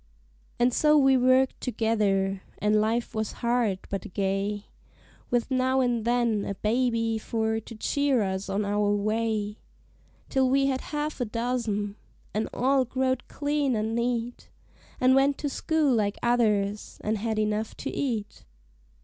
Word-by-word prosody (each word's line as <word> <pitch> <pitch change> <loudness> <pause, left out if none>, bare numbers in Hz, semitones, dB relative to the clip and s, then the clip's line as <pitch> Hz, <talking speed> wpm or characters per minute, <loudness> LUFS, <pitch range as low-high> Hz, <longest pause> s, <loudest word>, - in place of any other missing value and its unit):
And 245 0 +3
so 300 +3 +4
we 270 -2 +5
worked 255 +1 +3
together: 205 -5 0 0.2
and 210 0 +2
life 230 +2 -1
was 220 -1 -2
hard, 235 -5 0
but 195 -1 -4
gay, 200 +1 -1 0.6
With 245 +2 0
now 260 0 +2
and 240 -3 +1
then 235 -3 +1
a 200 - -4
baby 230 0 0
for 220 0 -1
to 230 +1 -11
cheer 275 +1 +1
us 190 0 -3
on 200 +2 0
our 205 0 +1
way; 215 0 -1 0.7
Till 265 -1 +2
we 275 +1 +3
had 265 -1 0
half 295 -1 -4
a - - +1
dozen, 220 -3 -2 0.4
an' 215 +1 -1
all 265 +2 +2
growed 260 0 -1
clean 285 -3 0
an' 220 +1 -1
neat, 235 0 -2 0.5
An' 255 +1 +5
went 275 +1 +3
to 290 - -2
school 310 -1 +1
like 210 -3 0
others, 210 -4 +1
an' 215 +1 0
had 220 +1 -2
enough 215 0 -1
to - - -4
eat. 225 -7 -3
230 Hz, 150 wpm, -27 LUFS, 210-255 Hz, 0.7 s, we